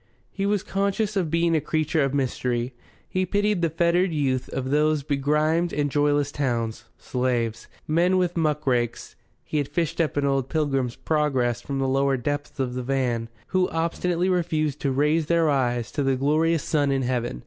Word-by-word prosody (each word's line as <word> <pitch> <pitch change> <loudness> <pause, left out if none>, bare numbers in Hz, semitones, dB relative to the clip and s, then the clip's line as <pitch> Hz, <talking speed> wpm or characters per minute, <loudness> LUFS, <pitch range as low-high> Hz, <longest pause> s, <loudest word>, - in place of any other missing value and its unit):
He 195 0 -2
was 205 -1 +1
conscious 200 +1 -1
of 180 -5 0
being 165 +1 +2
a 155 - +2
creature 155 0 0
of 135 - 0
mystery. 125 -2 -1 0.3
He 185 - -1
pitied 205 0 +1
the 165 - +2
fettered 170 +3 +2
youth 135 -5 -1
of 130 0 -3
these 150 0 +2
begrimed 150 +4 +1
and 145 -1 -1
joyless 145 0 +2
towns 115 -5 -2
slaves, 120 -3 -2 0.2
Men 175 +4 +3
with 180 -1 0
Muckrakes 135 -7 0 0.3
(he 150 - -2
had 145 - -1
fished 170 +1 -1
up 155 -3 -1
an 145 - +2
old 135 -2 0
"Pilgrim's 135 -6 0
Progress" 130 -6 0
from 140 +1 -4
the 135 0 0
lower 135 0 +2
depths 145 +4 -4
of 130 -2 -1
the 125 - -3
van), 125 -3 -1 0.2
who 185 -1 +2
obstinately 170 +2 0
refused 160 -5 0
to 140 - 0
raise 150 +3 +2
their 165 -2 +3
eyes 120 -4 0
to 145 - -2
the 135 -1 +2
glorious 155 +4 +2
sun 145 -3 +1
in 135 -1 +1
heaven. 120 - -2
145 Hz, 180 wpm, -25 LUFS, 130-165 Hz, 0.3 s, Men